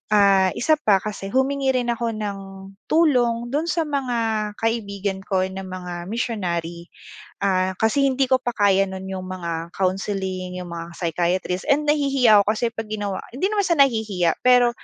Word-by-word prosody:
ah, 195 -2 +5
isa 310 +3 +2
pa 210 -8 +4
kasi 205 -2 -5
humingi 265 +2 +1
rin 245 -1 +1
ako 230 -1 -2
ng 205 -2 -4 0.5
tulong 240 -7 +2
dun 310 +4 -1
sa 340 -1 +1
mga 275 -5 -2 0.5
kaibigan 200 -4 -1
ko 190 -1 -1
na 190 +1 -4
mga 180 -2 -7
missionary. 175 -7 -3 0.5
Ah, 190 -1 +1
kasi 225 +6 +3
hindi 270 -1 +1
ko 260 - +5
pa 245 -1 -3
kaya 195 -2 +3
nun 190 0 -7
yung 185 -1 -5
mga 170 -2 -5
counseling, 185 -1 -2
yung 180 - -8
mga 170 0 -7
psychiatrist 175 +2 -1
and 295 +1 +2
nahihiya 275 -7 +4
ako 215 - +2
kasi 230 +2 -1
pag 225 -1 -6
ginawa 205 -3 -3 0.2
hindi 370 +11 0
naman 410 -2 +1
siya 340 -3 +1
nahihiya, 215 -10 +2
pero, 245 -1 +6
205 Hz, 165 wpm, -22 LUFS, 185-250 Hz, 0.5 s, pero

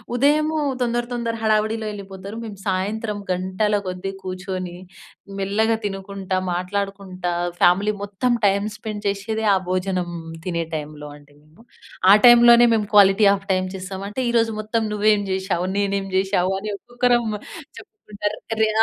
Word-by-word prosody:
ఉదయము 305 +4 +2 0.2
తొందర, 240 0 0
తొందర 235 -1 -2
హడావిడిలో 220 0 +1
వెళ్ళిపోతారు 195 +1 -8
మేము 215 -3 -8
సాయంత్రం 205 +3 -1
గంటల 190 +3 0
కొద్దీ 185 +1 -4
కూర్చొని, 185 -1 -5 0.6
మెల్లగా 220 +3 +1
తినుకుంటా, 195 -1 -3 0.2
మాట్లాడుకుంటా 185 0 -3 0.3
ఫ్యామిలీ 195 +4 +4
మొత్తం 205 +5 -1 0.2
టైమ్ 200 +1 +1
స్పెండ్ 210 -1 -6
చేసేదే 205 +3 -2
ఆ - - +3
భోజనం 185 -1 -1 0.4
తినే 170 -2 -1
టైంలో 150 -1 -6
అండి 145 0 -21
మేము. 155 +8 -22 0.5
ఆ - - +10
టైంలోనే 240 0 +8
మేము 210 -2 -1
క్వాలిటీ 200 0 +6
హాఫ్ 195 0 -2
టైం 185 0 0
చేస్తాం. 190 +1 -6
అంటే, 235 +5 -3
ఈరోజు 230 -1 +2
మొత్తం 220 +1 -1
నువ్వేం 210 0 +3
చేసావు, 190 -2 -1
నేనేం 200 -1 0
చేశావు 190 -1 +1
అని 210 +1 -5
ఒక్కొక్కరం 240 +1 +1 0.5
చెప్పుకుంటారు. 210 - -6 0.2
రే 220 - +4
200 Hz, 135 wpm, -22 LUFS, 185-220 Hz, 0.6 s, ఆ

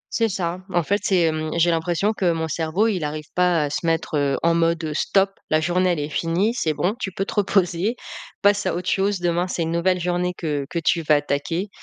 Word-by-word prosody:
C'est 230 -1 +2
ça. 180 -2 -2
En 175 -1 +1
fait, 200 +6 0
c'est, 190 -2 +2
hem, 155 -1 0
j'ai 170 +1 +4
l'impression 175 +5 0
que 185 -5 +1
mon 160 0 -2
cerveau, 165 +6 0
il 190 -7 -1
arrive 150 +1 -4
pas 180 -3 +2
à 145 - -1
se 150 +2 -3
mettre, 165 -1 0
heu, 140 -2 +1
en 170 0 +4
mode, 165 0 +1
heu: 155 -1 -3
«Stop, 195 +5 +2 0.2
la 155 - +3
journée, 180 +3 +1
elle 165 - -3
est 145 - -2
finie. 175 +8 0
C'est 160 -10 -1
bon, 180 +7 0
tu 190 - -3
peux 195 +2 -3
te - - -6
reposer, 195 +1 +1 0.5
passe 205 0 +3
à - - 0
autre 180 +1 -5
chose. 195 0 +1
Demain, 175 +1 0
c'est 175 -2 -2
une 165 - -2
nouvelle 180 +2 +1
journée 180 +1 -1
que 145 -4 -2
que - - -4
tu 165 0 +1
vas 155 -1 +3
attaquer» 145 +6 -1
170 Hz, 240 wpm, -22 LUFS, 160-185 Hz, 0.5 s, j'ai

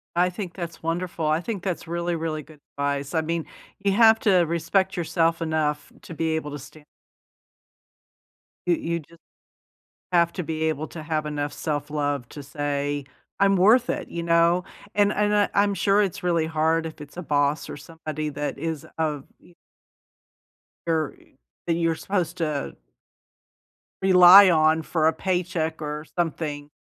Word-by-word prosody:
I 180 +1 +3
think 180 -1 -6
that's 170 -3 -7
wonderful. 170 0 -2
I 155 +1 +2
think 195 0 -5
that's 180 -4 -3
really, 170 +1 -2
really 160 -2 -3
good 150 +1 -17 0.2
advice. 140 0 -2
I 160 - +2
mean, 165 0 -2 0.3
you 200 0 +1
have 225 +1 +6
to 190 -4 +4
respect 180 +4 0
yourself 165 0 +1
enough 155 -2 -1
to - - -9
be 160 0 -1
able 150 -2 -4
to 145 - -6
stan 145 +3 -14 1.8
You 175 - +4
you 170 +1 -2
ju 165 +2 -17 1.0
have 170 -1 +3
to 180 - -4
be 160 0 -3
able 155 -1 -1
to 160 - -8
have 155 -1 -2
enough 145 -1 -3
self 145 -2 -3
love 145 -4 -2
to 145 - -9
say, 145 0 -3 0.3
"I'm 195 0 +4
worth 220 +7 +5
it." - - -3
You 170 - -4
know? 170 +1 +3 0.3
And 205 0 +3
and 210 0 +1
I 205 -1 +3
I'm 200 0 +3
sure 200 +2 +3
it's 195 -4 -2
really 170 -2 +1
hard 160 +1 +1
if 160 -1 -8
it's 145 +3 -12
a - - -3
boss 145 -1 0
or - - -6
somebody 155 0 -6
that 145 0 -4
is 160 0 -4
of 150 -3 -2
e 175 - -21 1.3
or 160 -3 0 0.5
that 170 - +2
you're 165 -1 +1
supposed 180 0 -2
to 150 -4 -2 1.3
rely 185 +1 +9
on 155 -1 +4
for 160 0 +1
a 160 - +3
paycheck 175 -3 -2
or 150 0 -4
something 150 -4 -2
165 Hz, 165 wpm, -24 LUFS, 150-180 Hz, 1.8 s, rely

